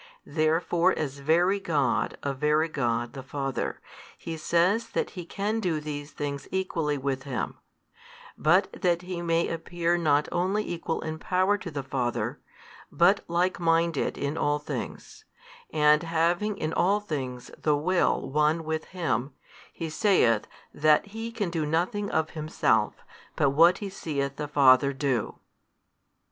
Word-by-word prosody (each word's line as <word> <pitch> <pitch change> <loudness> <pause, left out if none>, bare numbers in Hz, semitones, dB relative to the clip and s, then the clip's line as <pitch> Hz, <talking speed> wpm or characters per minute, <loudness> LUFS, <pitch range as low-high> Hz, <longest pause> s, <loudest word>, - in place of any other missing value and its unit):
Therefore 165 +3 +1
as 140 -2 -3
Very 175 +7 +3
God 145 -9 0
of 140 -2 -3
Very 150 +2 +2
God 120 -6 -1
the 135 - -7
Father, 135 0 -3 0.4
He 165 - -6
says 175 +7 +1
that - - -1
He 180 -4 -7
can 210 +5 -2
do 175 -7 0
these 145 -1 -6
things 140 -2 -5
equally 165 -6 -1
with 135 -1 -2
Him; 135 -5 -4 0.8
but 185 +5 +3
that 175 -1 0
He 180 -1 -5
may 170 0 +1
appear 170 +1 -1
not 150 -3 +2
only 190 +4 0
Equal 165 -1 -3
in 160 0 -5
Power 185 +4 +2
to 185 - -6
the 145 -3 -4
Father, 125 -2 -2 0.5
but 185 +4 +4
likeminded 170 -2 +1
in 145 +2 -2
all 145 0 +2
things, 430 - -7 0.5
and 150 0 +4
having 170 +5 0
in 155 -3 -2
all 200 +3 +3
things 130 -10 -5
the 150 -2 +2
Will 175 -1 +1
One 150 +4 +1
with 160 0 -3
Him, 150 -8 -2 0.4
He 165 - -5
saith 155 - +3 0.3
that 150 0 +4
He 225 +3 -6
can 205 -6 -2
do 165 -2 -1
nothing 180 +7 -1
of 160 0 0
Himself, 150 -9 +1 0.4
but 140 - +2
what 170 +5 +5
He 205 - -5
seeth 140 -6 -3
the 150 - -3
Father 140 -1 +5
do. 135 -5 -1
160 Hz, 145 wpm, -27 LUFS, 145-175 Hz, 0.8 s, what